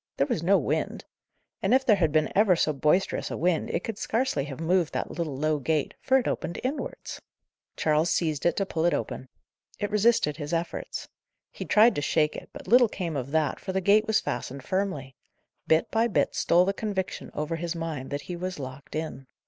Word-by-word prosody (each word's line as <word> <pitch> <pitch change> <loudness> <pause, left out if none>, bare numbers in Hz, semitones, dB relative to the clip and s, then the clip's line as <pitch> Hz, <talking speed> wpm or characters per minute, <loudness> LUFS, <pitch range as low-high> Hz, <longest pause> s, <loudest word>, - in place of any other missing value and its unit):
There 140 - +3
was 155 - -1
no 195 +4 +4
wind. - - -2 0.6
And - - +3
if 265 0 +2
there 215 -5 +5
had 165 -5 +2
been 155 0 +1
ever 200 -2 +5
so 155 -2 +1
boisterous 150 +7 +1
a - - -4
wind, 175 0 +1
it - - -2
could 225 -2 -5
scarcely 225 - 0
have 140 -2 -7
moved 170 0 +1
that - - -3
little 155 -6 -3
low 155 +1 +1
gate, 150 +2 0
for 265 - +4
it 260 - 0
opened 170 - -3
inwards. 270 +4 -4 0.6
Charles 155 +2 +2
seized 155 -3 +1
it - - +1
to 195 - 0
pull 165 -3 -1
it 175 - +3
open. 130 - -5 0.5
It 205 0 -3
resisted 210 -8 +3
his 150 +1 -5
efforts. 170 +1 -3 0.4
He - - -7
tried 225 +3 +5
to 145 - -2
shake 150 +1 +1
it, - - -8
but - - -11
little 245 -1 +6
came 170 -6 -4
of 135 -1 -3
that, 155 -1 0
for 190 - -5
the 190 - +1
gate 205 +3 +4
was 220 -1 +3
fastened 130 +2 -4
firmly. 170 -9 -2 0.5
Bit 160 +1 +2
by 225 +1 +3
bit 210 - +1
stole 175 +2 +3
the 195 - 0
conviction 195 -3 -3
over 155 +2 -2
his 170 +1 -3
mind 160 -5 -4
that 145 0 -3
he 180 - -6
was 185 +1 -4
locked 135 +1 -8
in. 155 -4 -5
170 Hz, 210 wpm, -27 LUFS, 150-200 Hz, 0.6 s, little